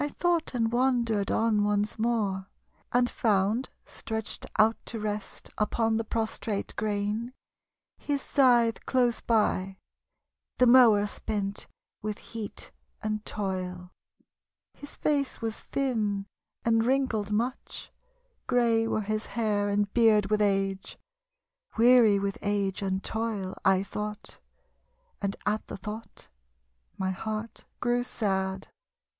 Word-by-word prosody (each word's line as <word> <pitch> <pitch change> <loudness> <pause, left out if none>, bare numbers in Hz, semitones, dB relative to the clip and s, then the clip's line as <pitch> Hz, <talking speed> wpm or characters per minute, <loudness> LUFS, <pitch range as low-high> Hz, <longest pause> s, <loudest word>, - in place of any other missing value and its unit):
I 290 - -1
tho't 345 -5 +1
and 230 -2 +1
wandered 235 -4 +1
on 220 -2 +2
once 210 +1 0
more, 210 -5 0 0.4
And 245 0 +3
found 215 +2 +1 0.2
stretched 220 -1 -5
out 220 +1 +5
to 230 - -3
rest 210 -1 -5
Upon 225 +1 +1
the 225 - -1
prostrate 220 -2 -3
grain, 215 +3 -2 0.7
his 285 -1 -1
scythe 240 -5 +3
close 245 -3 +2
by, 195 -4 +1 0.8
The 250 - +5
mower 235 -5 +7
spent 205 -1 -3 0.3
with 210 0 -3
heat 225 -3 -8 0.3
and 215 0 -2
toil. 185 -3 -4 0.8
His 290 - -10
face 285 -3 0
was 225 -2 -3
thin 215 -7 -1 0.4
and 225 -1 +3
wrinkled 240 -5 +1
much. 235 +5 -3 0.6
Grey 230 -3 +3
were 220 - 0
his 215 +1 -2
hair 210 -3 0
and 205 0 0
beard 215 -4 +4
with 215 0 +3
age. 195 -1 0 0.8
Weary 230 -3 +6
with 195 0 -2
age 200 -2 -1
and 190 -1 -1
toil, 220 -4 -2
I 190 0 +4
tho't, 210 +1 -6 0.8
And 200 -1 -1
at 210 +1 -1
the - - -6
tho't 210 +3 -8 0.7
my 190 0 -1
heart 215 +3 -5
grew 245 0 +1
sad. 190 -4 -2
215 Hz, 120 wpm, -28 LUFS, 200-235 Hz, 0.8 s, mower